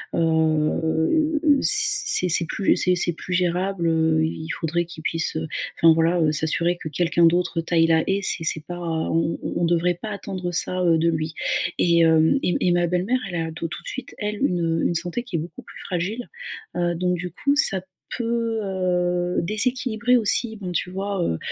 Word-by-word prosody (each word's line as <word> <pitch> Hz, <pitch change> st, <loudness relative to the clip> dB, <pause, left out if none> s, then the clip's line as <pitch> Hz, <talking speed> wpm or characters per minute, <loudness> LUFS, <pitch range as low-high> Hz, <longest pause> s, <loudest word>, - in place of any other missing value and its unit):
heu, 160 Hz, -, +1 dB, 0.2 s
c'est 420 Hz, -, +5 dB
c'est 170 Hz, 0 st, +4 dB
plus 195 Hz, -, +1 dB
c'est 180 Hz, -1 st, +2 dB
c'est 175 Hz, 0 st, +1 dB
plus 180 Hz, +3 st, -7 dB
gérable, 180 Hz, 0 st, 0 dB
heu, 160 Hz, -1 st, +2 dB
i 160 Hz, 0 st, -3 dB
il -, -, -9 dB
faudrait 170 Hz, +1 st, -1 dB
qu'il 165 Hz, -2 st, -11 dB
puisse, 165 Hz, -1 st, -1 dB
heu, 160 Hz, 0 st, -3 dB, 0.3 s
enfin, 165 Hz, -1 st, +5 dB
voilà, 165 Hz, +2 st, +1 dB
heu, 155 Hz, -1 st, +3 dB
s'assurer 170 Hz, +3 st, 0 dB
que 160 Hz, -, -8 dB
quelqu'un 170 Hz, +2 st, +1 dB
d'autre 175 Hz, 0 st, +1 dB
taille 165 Hz, 0 st, +2 dB
la 160 Hz, -1 st, +3 dB
haie. 195 Hz, +1 st, 0 dB
C'est 165 Hz, -4 st, 0 dB
c'est 155 Hz, -1 st, +1 dB
pas 175 Hz, 0 st, -7 dB
on 165 Hz, 0 st, -1 dB
on -, -, -4 dB
on 170 Hz, -, +1 dB
devrait 175 Hz, +1 st, +1 dB
pas 220 Hz, -, -5 dB
attendre 185 Hz, -3 st, -5 dB
ça, 185 Hz, +2 st, -1 dB
heu, 165 Hz, -2 st, +3 dB
de 165 Hz, +1 st, +2 dB
lui. 155 Hz, 0 st, -2 dB, 0.5 s
Et 170 Hz, -1 st, +3 dB
hem, 160 Hz, -, +4 dB
et 180 Hz, -, +1 dB
et -, -, +3 dB
ma 175 Hz, 0 st, +2 dB
belle-mère, 185 Hz, +9 st, 0 dB
elle 175 Hz, -, -6 dB
a 160 Hz, 0 st, -4 dB
tout 165 Hz, +1 st, -5 dB
tout -, -, -8 dB
de -, -, -11 dB
suite, 265 Hz, -2 st, -7 dB
elle, 210 Hz, 0 st, -3 dB
une 165 Hz, -4 st, 0 dB
une 170 Hz, -, -2 dB
santé 175 Hz, +8 st, -2 dB
qui 220 Hz, -9 st, -7 dB
est -, -, -2 dB
beaucoup 170 Hz, +3 st, -8 dB
plus -, -, -13 dB
fragile. 195 Hz, +7 st, -4 dB, 0.5 s
Heu, 175 Hz, -1 st, 0 dB
donc 180 Hz, +1 st, 0 dB
du 180 Hz, 0 st, -6 dB
coup, 280 Hz, +9 st, 0 dB
ça 195 Hz, -10 st, +3 dB, 0.4 s
peut, 230 Hz, -1 st, -1 dB
heu, 180 Hz, -2 st, -1 dB
déséquilibrer 245 Hz, +4 st, +1 dB
aussi, 220 Hz, 0 st, 0 dB
bon, 185 Hz, -3 st, -6 dB
tu 180 Hz, -, -2 dB
vois, 195 Hz, -1 st, -3 dB
heu 80 Hz, -, -1 dB
175 Hz, 200 wpm, -23 LUFS, 165-195 Hz, 0.5 s, c'est